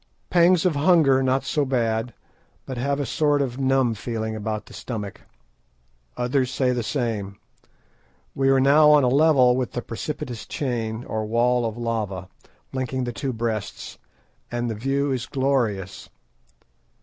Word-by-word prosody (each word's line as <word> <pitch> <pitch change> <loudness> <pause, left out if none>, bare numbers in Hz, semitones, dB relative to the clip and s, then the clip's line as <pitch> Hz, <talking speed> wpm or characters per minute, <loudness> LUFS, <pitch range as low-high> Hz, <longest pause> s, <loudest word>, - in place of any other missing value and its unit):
Pangs 175 0 +4
of 175 -4 +2
hunger 145 -4 +4
not 130 +1 +1
so 150 -3 0
bad, 115 -3 0 0.5
but 130 - -5
have 140 +3 0
a 145 - -1
sort 145 +1 +1
of 130 -2 -2
numb 135 -3 +2
feeling 110 0 -4
about 110 0 -4
the - - -15
stomach. 105 -5 -6 1.0
Others 125 +1 0
say 130 0 +1
the 125 -1 -1
same. 110 -6 -3 1.0
We 135 0 +1
are 135 0 +4
now 145 +3 +6
on 150 -2 +6
a - - +3
level 135 -3 +5
with 130 -1 -2
the 120 - -3
precipitous 120 -1 -6
chain, 120 -4 -3
or 110 -3 -3
wall 120 +1 +2
of 110 0 -6
lava, 105 -6 -3 0.4
linking 130 0 -2
the 120 -1 -3
two 135 +2 -3
Breasts, 115 -3 -4 0.5
and 120 -1 -2
the - - -1
view 135 +5 -1
is 125 -3 -2
glorious. 120 -9 -1
125 Hz, 150 wpm, -24 LUFS, 115-135 Hz, 1.0 s, now